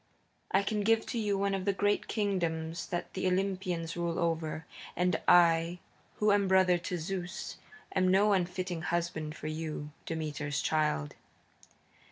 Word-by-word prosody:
I 195 Hz, -, +3 dB
can 210 Hz, +1 st, -1 dB
give 225 Hz, +2 st, +3 dB
to 235 Hz, -, -3 dB
you 205 Hz, -2 st, 0 dB
one 200 Hz, 0 st, +1 dB
of 190 Hz, -1 st, -2 dB
the 200 Hz, -, +2 dB
great 205 Hz, +1 st, +1 dB
kingdoms 170 Hz, -5 st, -1 dB
that 175 Hz, -, -4 dB
the -, -, -1 dB
Olympians 185 Hz, -3 st, -1 dB
rule 170 Hz, -1 st, -1 dB
over. 165 Hz, -1 st, -1 dB, 0.3 s
And 180 Hz, -1 st, +1 dB
I, 170 Hz, 0 st, +5 dB, 0.4 s
who 210 Hz, 0 st, +3 dB
am 200 Hz, -1 st, +3 dB
brother 185 Hz, -2 st, +4 dB
to 180 Hz, +1 st, -3 dB
Zeus, 180 Hz, +3 st, -4 dB, 0.4 s
am 185 Hz, -1 st, +3 dB
no 200 Hz, +3 st, +4 dB
unfitting 180 Hz, -2 st, -1 dB
husband 165 Hz, -2 st, -2 dB
for -, -, -10 dB
you, 155 Hz, -1 st, -4 dB, 0.2 s
Demeter's 150 Hz, -3 st, -2 dB
child." 150 Hz, -, 0 dB
175 Hz, 150 wpm, -31 LUFS, 160-195 Hz, 0.4 s, I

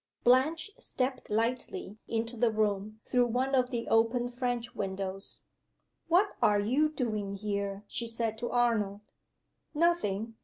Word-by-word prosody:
BLANCHE 305 Hz, +9 st, +3 dB
stepped 255 Hz, 0 st, -2 dB
lightly 225 Hz, -2 st, -2 dB
into 230 Hz, +1 st, -2 dB
the 235 Hz, +1 st, +3 dB
room, 215 Hz, -1 st, -1 dB
through 245 Hz, -1 st, +3 dB
one 255 Hz, +3 st, 0 dB
of 255 Hz, -2 st, +3 dB
the 235 Hz, -2 st, -3 dB
open 230 Hz, +2 st, +2 dB
French 245 Hz, -1 st, -2 dB
windows. 195 Hz, 0 st, -4 dB, 0.7 s
"What 365 Hz, +5 st, +4 dB
are 205 Hz, -1 st, +4 dB
you 260 Hz, +9 st, +2 dB
doing 215 Hz, -9 st, -2 dB
here?" 200 Hz, 0 st, -3 dB
she 235 Hz, -, -2 dB
said 225 Hz, -1 st, -1 dB
to 240 Hz, -, -2 dB
Arnold. 225 Hz, -5 st, +1 dB, 0.7 s
"Nothing. 225 Hz, -, +1 dB
230 Hz, 130 wpm, -30 LUFS, 210-250 Hz, 0.7 s, What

